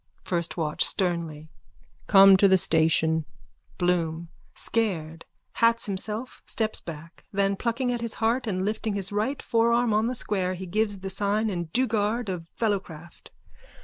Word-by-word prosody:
FIRST 170 -1 -1
WATCH: 155 -3 0
(Sternly.) 165 -4 -1 0.6
Come 195 -1 +8
to 200 - +5
the 190 0 +5
station. 160 -1 +2 0.5
BLOOM: 170 -2 -1 0.3
_(Scared, 165 -8 -1 0.3
hats 230 0 +3
himself, 210 +5 -3
steps 220 -1 +1
back, 165 0 -10
then, 195 0 +1
plucking 245 +4 -1
at 240 -1 -3
his 235 -2 -1
heart 235 +2 0
and 190 -2 -1
lifting 215 0 -2
his 195 -1 -1
right 215 +7 -1
forearm 235 0 +2
on 215 +2 +2
the 250 - -1
square, 185 -5 0
he 190 +1 -7
gives 205 +1 -1
the 195 0 -2
sign 205 +2 0
and 170 -3 -4
dueguard 225 -1 0
of 170 -3 -5
fellowcraft.) 180 -7 -4
195 Hz, 145 wpm, -26 LUFS, 170-225 Hz, 0.6 s, Come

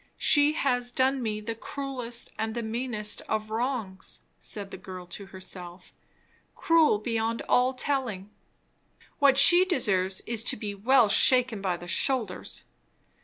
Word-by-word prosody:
She 290 0 +4
has 245 -5 0
done 265 +1 +1
me 215 -2 -3
the 230 +2 -4
cruelest 245 -1 -6
and 220 0 -3
the 235 - -3
meanest 220 -2 -3
of 215 0 -2
wrongs, 225 -5 -4 0.2
said 200 -2 -5
the - - -7
girl 185 -1 -9
to 195 +3 -8
herself; 180 -1 -9 0.6
cruel 325 -8 +3
beyond 230 +1 -2
all 255 +1 +2
telling; 245 -8 -3 0.9
what 275 -2 +5
she 350 +6 +8
deserves 195 - 0
is 230 -2 -3
to - - +2
be 210 -1 -5
well 235 +4 +3
shaken 245 0 +4
by 185 -3 -1
the 175 - -11
shoulders. 220 +1 -1
230 Hz, 140 wpm, -27 LUFS, 200-260 Hz, 0.9 s, she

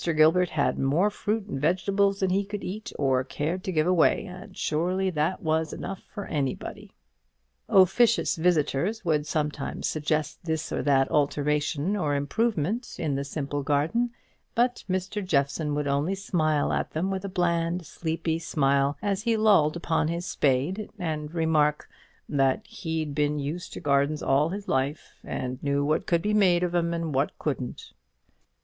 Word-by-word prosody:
Gilbert 165 +3 +5
had 145 -2 0
more 160 +10 +2
fruit 210 +1 -2
and 135 -10 -5
vegetables 195 +4 +1
than 190 -1 +2
he 195 +2 +2
could 205 0 -6
eat 215 +5 -5
or 130 -2 +2
cared 165 +8 -3
to 190 - -2
give 155 -3 +2
away; 180 +2 +3
and 190 +1 -10
surely 185 +5 0
that 160 +3 -1
was 160 0 0
enough 195 +1 -6
for 205 -2 -6
anybody." 140 -4 -4 0.8
Officious 210 +6 +4
visitors 175 +4 +1
would 155 -2 +1
sometimes 150 -1 -2
suggest 155 0 -1
this 160 -1 -2
or - - -1
that 135 -2 +3
alteration 150 +3 +1
or 150 -7 0
improvement 215 - -1
in 155 -4 -1
the 140 +1 -1
simple 145 0 -3
garden; 150 - +1 0.5
but 245 +1 +1
Mr. 190 +3 -2
Jeffson 150 -2 0
would 150 0 -1
only 145 +7 +1
smile 155 -6 0
at - - -2
them 180 +5 -1
with 190 0 -3
a 200 - -4
bland, 170 -1 0
sleepy 165 0 -2
smile, 140 -3 +1
as 200 -1 0
he 230 0 +1
lolled 200 -9 +4
upon 165 -2 0
his 170 +2 -2
spade, 145 +10 0
and 155 -5 -3
remark, 155 -2 +2 0.4
"that 135 +6 +1
he'd 160 -8 -4
been 150 0 +1
used 150 +5 -4
to - - -6
gardens 145 0 +1
all 145 +4 +3
his 200 +2 -5
life, 135 +3 -2
and 130 0 -4
knew 140 0 0
what 155 +2 0
could 170 -1 +2
be 210 - +1
made 180 -4 +4
out - - +3
of - - -11
'em, 170 -1 +1
and 165 -2 -2
what 135 +2 0
couldn't." 135 -5 -4
160 Hz, 165 wpm, -27 LUFS, 145-190 Hz, 0.8 s, Gilbert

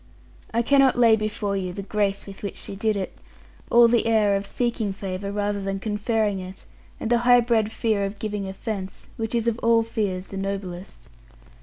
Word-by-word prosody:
I 235 +1 +1
cannot 275 0 +4
lay 230 -2 +6
before 210 -2 -2
you 185 -2 -3
the 200 - -5
grace 200 -1 -1
with 195 -1 -10
which 200 - -5
she 195 - -6
did 215 +1 0
it, 195 -2 -4 0.5
all 235 0 +7
the 230 -1 +2
air 215 -3 +3
of 195 0 -2
seeking 230 -4 -1
favour, 195 0 -4
rather 205 0 -1
than 195 0 -2
conferring 210 0 0
it, 185 +1 -9 0.3
and 225 - -3
the 240 - +4
high 245 0 +6
bred 225 -2 +1
fear 220 -3 0
of 200 +1 -3
giving 210 -2 -3
offence, 190 0 -6
which 225 +1 -3
is 230 0 0
of 235 0 0
all 230 0 +4
fears 200 -5 -3
the 195 - -6
noblest. 190 -9 -5
210 Hz, 190 wpm, -24 LUFS, 195-230 Hz, 0.5 s, all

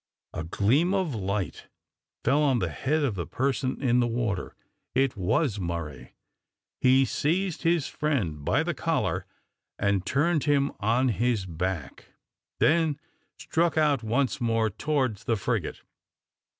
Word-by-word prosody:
A 85 - -3
gleam 130 - +2
of 185 -7 0
light 100 -2 -3 0.6
fell 140 +5 +3
on 140 -4 +3
the 90 -7 -1
head 150 - 0
of 135 -6 +1
the 85 -4 -4
person 130 0 -1
in 125 -1 +3
the 120 - +2
water. 115 -5 -2 0.4
It 135 -1 +2
was 105 - 0
Murray. 85 -6 -5 0.6
He 130 +1 +5
seized 175 +7 -1
his 165 -3 +2
friend 105 - -1
by - - +2
the - - -1
collar - - -1 0.5
and 100 -2 +1
turned 150 - +1
him 140 -1 +2
on 115 +5 +2
his 115 -2 0
back, 85 -4 -4 0.5
then 155 -2 +3 0.4
struck 165 0 0
out 150 -5 +3
once 125 +5 0
more 115 -2 +1
towards 130 -4 -1
the 115 - +2
frigate. 100 - -2
125 Hz, 135 wpm, -27 LUFS, 100-145 Hz, 0.6 s, He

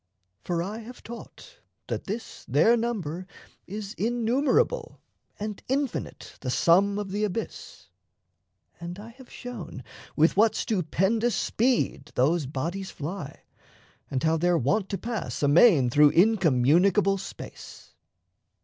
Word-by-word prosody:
For 170 -1 -1
I 210 +5 -5
have 240 +2 -11
taught 235 - -11 0.3
That - - -4
this 220 +4 -6
their 155 - +4
number 185 -7 -3 0.4
is 205 +1 -6
innumerable 250 - +1 0.4
And 210 -1 -5
infinite 270 -1 -3
the 130 - -3
sum 190 +9 +3
of 205 -2 -4
the 205 +2 -1
Abyss, 210 +2 -5 0.9
And 170 +1 -7
I 210 +3 -10
have 255 +2 -15
shown 230 - -8 0.3
with 160 +2 +4
what 220 +2 +4
stupendous 210 +4 0
speed 230 - 0
Those 145 +3 +2
bodies 170 +8 -4
fly 155 -1 -7 0.7
and 130 -1 -2
how 160 0 +3
they're 175 +1 +2
wont 160 - 0
to 195 - -2
pass 230 -8 -4
Amain 145 - +5
through 150 +3 +6
incommunicable 190 - +4
space. 195 - -10
195 Hz, 120 wpm, -26 LUFS, 160-225 Hz, 0.9 s, through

